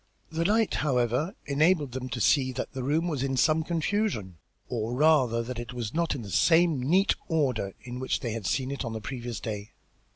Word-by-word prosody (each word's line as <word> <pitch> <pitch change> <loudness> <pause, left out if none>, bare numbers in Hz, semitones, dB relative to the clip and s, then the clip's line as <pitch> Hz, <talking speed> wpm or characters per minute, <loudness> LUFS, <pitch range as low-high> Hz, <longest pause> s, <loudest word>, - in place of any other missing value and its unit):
This 165 +2 0
light, 220 -1 +2
however, 125 - +1
enabled 150 0 +2
them 130 0 -5
to - - -4
see 130 -3 +3
that - - -4
the 130 - -5
room 155 +6 +1
was 150 -7 -2
in 135 -1 -1
some 155 +4 +3
confusion, 165 - -1 0.3
or 120 -1 -2
rather, 130 -6 +3
that 120 0 -5
it 120 +1 -6
was 120 -3 -4
not 170 0 0
in 125 - -6
the 100 - -8
same 160 - +4
neat 180 +10 +3
order 130 - 0
in 125 0 -6
which 130 - -1
they 120 - -2
had 110 -4 -4
seen 130 +6 0
it 140 - -3
on 115 -2 -4
the 110 - -3
previous 120 0 -5
day. 105 -2 -6
130 Hz, 205 wpm, -28 LUFS, 120-160 Hz, 0.3 s, same